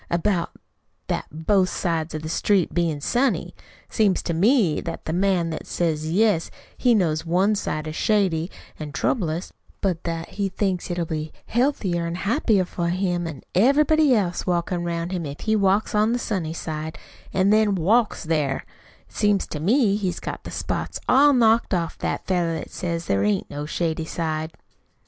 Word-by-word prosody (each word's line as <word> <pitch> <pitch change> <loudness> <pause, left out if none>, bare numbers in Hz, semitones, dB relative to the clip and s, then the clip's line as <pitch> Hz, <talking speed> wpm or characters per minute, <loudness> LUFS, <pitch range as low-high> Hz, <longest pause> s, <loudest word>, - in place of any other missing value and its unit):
"About 170 0 0 0.6
that - - -2
both 185 +5 +2
sides 165 -3 -2
of 155 - -5
the - - -4
street 185 +2 +1
bein' 165 -4 0
sunny 250 - 0 0.3
it - - -23
seems 205 -5 +2
to 170 - -2
me 195 - +3
that 165 - -6
the 160 - -2
man 180 -2 +1
what 160 - -6
says, 160 -2 -1
yes, 205 -3 +2 0.3
he 245 -2 +3
knows 160 -6 +1
one 185 +5 +2
side 155 -7 -2
is 155 0 -5
shady 185 -6 +1 0.3
an' 150 -2 -6
troublous, 170 -3 -1 0.3
but 180 -4 -1
that 165 -1 -3
he 200 -1 -2
thinks 190 -1 -2
it'll 175 -1 -1
be 155 -1 -4
healthier 210 -10 0
an' 170 - -3
happier 205 - +1
for 175 -1 -3
him 175 -1 0
an' 150 -5 -8
everybody 285 - +4
else 180 -5 0
'round 170 -1 -1
him 175 -4 -3
if 140 +1 -8
he 220 -1 +1
walks 200 +2 +2
on 215 +2 +3
the - - +1
sunny 190 -9 -2
side, 155 -1 -5 0.3
an' 190 +1 +2
then 215 -2 +4
WALKS 210 +6 +2
THERE 150 -4 -1 0.4
it - - -25
seems 205 -2 +2
to 150 - -6
me 205 - +3
he's 190 -4 -2
got - - -6
the - - -5
spots - - -3
all 285 +3 +6
knocked 230 -5 +3
off 170 -2 -2
that - - -2
feller 175 -3 0
what - - -8
says 170 -2 -3
there 100 0 +1
AIN'T 100 -2 0
no 145 +1 -5
shady 160 0 -1
side!" 160 -1 -3
175 Hz, 175 wpm, -23 LUFS, 160-205 Hz, 0.6 s, all